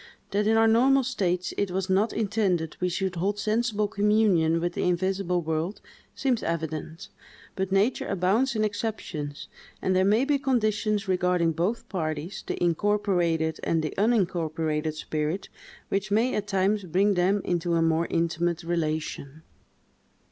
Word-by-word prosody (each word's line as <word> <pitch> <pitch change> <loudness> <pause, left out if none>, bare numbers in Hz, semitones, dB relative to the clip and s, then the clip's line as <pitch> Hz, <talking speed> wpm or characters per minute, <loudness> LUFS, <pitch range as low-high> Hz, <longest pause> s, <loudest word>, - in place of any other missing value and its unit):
That 205 +1 +1
in 225 0 +4
our 225 0 +5
normal 260 +4 +4
states 185 -8 -1
it 200 - 0
was 190 +1 -2
not 200 +4 +2
intended 195 -7 0
we 180 - 0
should 185 0 -2
hold 200 +4 0
sensible 215 0 0
communion 200 -6 +2
with 175 +1 -2
the - - -3
invisible 180 0 0
world, 160 +5 -2 0.4
seems 260 -4 0
evident; 160 -1 -4 0.5
but 190 0 -2
nature 200 +6 +1
abounds 200 +8 +1
in 215 - +1
exceptions; 205 -9 -4 0.3
and 185 - 0
there 185 - +4
may 215 +7 +3
be 285 -1 +1
conditions 215 -5 0
regarding 180 -2 +2
both 200 +9 -2
parties, 160 -2 -4
the - - -2
incorporated 175 -3 +1
and 165 -1 0
the 155 - -3
unincorporated 165 -7 0
spirit, 155 +4 -3 0.4
which 195 +1 -1
may 225 +5 +2
at 210 -1 -2
times 200 +1 +1
bring 190 +4 +2
them 190 +3 +2
into 175 -1 0
a 165 - +2
more 165 +1 +1
intimate 170 0 0
relation. 155 -3 -3
185 Hz, 150 wpm, -26 LUFS, 165-210 Hz, 0.5 s, our